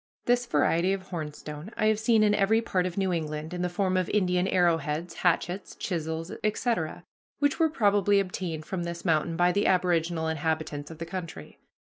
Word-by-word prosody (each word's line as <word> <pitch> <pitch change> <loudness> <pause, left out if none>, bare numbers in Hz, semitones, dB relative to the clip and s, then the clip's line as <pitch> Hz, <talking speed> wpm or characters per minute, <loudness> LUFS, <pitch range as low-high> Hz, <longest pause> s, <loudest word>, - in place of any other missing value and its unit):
This 245 0 +2
variety 170 +4 +2
of 195 -1 -4
hornstone 150 0 -6
I - - +1
have 215 -1 +3
seen 220 -1 +4
in 210 -1 +4
every 210 +2 +3
part 185 -5 0
of 180 - -7
New 190 -2 +1
England 155 0 -3
in 175 - -3
the 180 - 0
form 185 +1 0
of 185 -2 0
Indian 180 -3 +2
arrow 175 -3 +3
heads, 160 +3 -4
hatchets, 180 +2 0
chisels, 165 -1 -3
etc., 215 -6 -1 0.3
which 285 +2 +1
were 325 -1 +4
probably 205 - +3
obtained 180 -5 -3
from 190 -2 -3
this 170 +1 -6
mountain 165 0 +1
by 175 +1 +4
the 200 +3 +1
aboriginal 170 -3 +1
inhabitants 155 -2 -2
of 165 - -9
the 165 - -5
country." 175 -1 -7
180 Hz, 185 wpm, -27 LUFS, 160-200 Hz, 0.3 s, seen